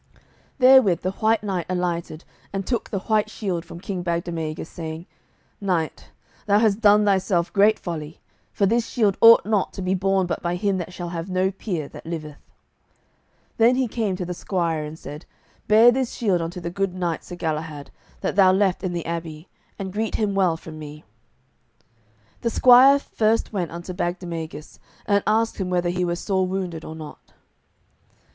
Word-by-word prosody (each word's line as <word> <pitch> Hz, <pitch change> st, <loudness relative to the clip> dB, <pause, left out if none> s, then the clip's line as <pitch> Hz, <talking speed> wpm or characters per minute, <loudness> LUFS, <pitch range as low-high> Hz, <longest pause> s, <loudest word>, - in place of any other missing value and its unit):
Therewith 255 Hz, -, +6 dB
the 185 Hz, -, -1 dB
White 220 Hz, +2 st, +1 dB
Knight 190 Hz, -4 st, -2 dB
alighted 175 Hz, -3 st, -3 dB, 0.3 s
and 195 Hz, -1 st, -3 dB
took 240 Hz, 0 st, -2 dB
the 195 Hz, -, -3 dB
white 215 Hz, 0 st, +1 dB
shield 190 Hz, -6 st, -3 dB
from 170 Hz, -1 st, -10 dB
King 185 Hz, 0 st, -4 dB
Bagdemagus, 170 Hz, -2 st, -3 dB
saying, 160 Hz, 0 st, -7 dB, 0.6 s
"Knight, 175 Hz, -5 st, -2 dB, 0.4 s
thou 205 Hz, 0 st, +4 dB
hast 215 Hz, -1 st, +2 dB
done 210 Hz, -1 st, +5 dB
thyself 190 Hz, -3 st, +1 dB
great 210 Hz, +2 st, +4 dB
folly, 160 Hz, -3 st, -6 dB, 0.3 s
for 200 Hz, -, +1 dB
this 230 Hz, +3 st, +1 dB
shield 210 Hz, -6 st, +1 dB
ought 230 Hz, 0 st, +8 dB
not 210 Hz, -3 st, 0 dB
to -, -, -6 dB
be 185 Hz, +1 st, 0 dB
borne 190 Hz, 0 st, +1 dB
but 170 Hz, -2 st, -3 dB
by 175 Hz, 0 st, -1 dB
him 195 Hz, +1 st, 0 dB
that 175 Hz, 0 st, -5 dB
shall 175 Hz, -1 st, -6 dB
have 170 Hz, +1 st, -5 dB
no 185 Hz, +1 st, +1 dB
peer 180 Hz, -6 st, -4 dB
that -, -, -12 dB
liveth." 155 Hz, -3 st, -6 dB, 1.2 s
Then 235 Hz, +2 st, +5 dB
he 260 Hz, -1 st, +1 dB
came 215 Hz, -4 st, -2 dB
to 180 Hz, -1 st, -4 dB
the 180 Hz, -, -4 dB
squire, 170 Hz, -4 st, -2 dB
and 150 Hz, +1 st, -7 dB
said, 150 Hz, +1 st, -10 dB, 0.4 s
"Bear 225 Hz, +3 st, +7 dB
this 255 Hz, 0 st, -1 dB
shield 195 Hz, -7 st, 0 dB
unto 170 Hz, +2 st, -5 dB
the 170 Hz, -1 st, -5 dB
good 195 Hz, 0 st, -2 dB
knight 175 Hz, -3 st, -2 dB
Sir 175 Hz, -, -8 dB
Galahad, 155 Hz, -3 st, -4 dB, 0.3 s
that -, -, -2 dB
thou 190 Hz, -2 st, +6 dB
left 190 Hz, 0 st, +1 dB
in 185 Hz, -2 st, -2 dB
the 170 Hz, -1 st, -4 dB
abbey, 165 Hz, 0 st, -6 dB, 0.3 s
and 190 Hz, -2 st, -6 dB
greet 220 Hz, +1 st, -2 dB
him 210 Hz, -2 st, 0 dB
well 185 Hz, -4 st, +2 dB
from 160 Hz, -1 st, -10 dB
me." 150 Hz, 0 st, -9 dB, 1.4 s
The 235 Hz, -, 0 dB
squire 255 Hz, +4 st, +7 dB
first 225 Hz, -5 st, 0 dB
went 180 Hz, -5 st, -2 dB
unto 170 Hz, +2 st, -7 dB
Bagdemagus, 170 Hz, -4 st, -5 dB, 0.3 s
and 200 Hz, -1 st, +2 dB
asked 225 Hz, +1 st, +1 dB
him 185 Hz, -2 st, -2 dB
whether 175 Hz, -1 st, 0 dB
he 180 Hz, +1 st, -1 dB
were 175 Hz, -1 st, 0 dB
sore 190 Hz, +1 st, -1 dB
wounded 180 Hz, -3 st, -4 dB
or 160 Hz, -, -8 dB
not. 155 Hz, -2 st, -11 dB
185 Hz, 180 wpm, -23 LUFS, 170-205 Hz, 1.4 s, ought